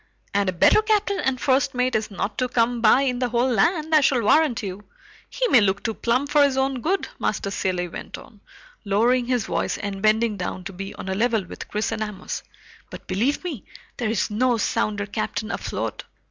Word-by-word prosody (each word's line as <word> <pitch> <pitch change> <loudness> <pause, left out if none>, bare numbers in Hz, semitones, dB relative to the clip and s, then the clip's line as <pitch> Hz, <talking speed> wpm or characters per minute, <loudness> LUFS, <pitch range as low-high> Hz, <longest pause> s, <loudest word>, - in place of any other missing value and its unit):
"And 200 -1 +2
a - - +1
better 180 - +5
captain 420 -2 +1
and 260 -1 0
first 270 0 +1
mate 250 +1 +1
is 220 0 0
not 205 +3 -3
come 235 0 +2
by 230 +4 +5
in 250 -2 0
the 250 -1 0
whole 240 +2 +1
land, 310 - +1
I 305 - +7
shall 265 -4 +2
warrant 250 -1 +3
you. 195 +1 -6 0.5
He - - 0
may 245 - +6
look 200 0 +1
too 225 - -1
plump 250 +6 0
for 295 -1 +5
his 275 -2 +2
own 265 -1 0
good," 380 +8 0
Master 200 - -1
Cilley 180 -3 -1
went 170 - -8
on, 210 -2 -15 0.4
lowering 235 +5 +2
his 245 -4 0
voice - - -1
and 200 -1 -5
bending 215 0 +2
down 185 0 -4
to 195 +2 -7
be 195 +2 -7
on - - -8
a 190 - -1
level 225 0 +1
with - - -9
Chris 210 +2 -2
and 225 -1 -3
Amos, 210 -3 -4 0.5
"but - - -10
believe 230 - 0
me, 310 - -5 0.3
there's 220 -2 -1
no 245 +3 +2
sounder 205 -1 -1
captain 215 +1 -3
afloat. - - -4
230 Hz, 200 wpm, -23 LUFS, 205-260 Hz, 0.5 s, I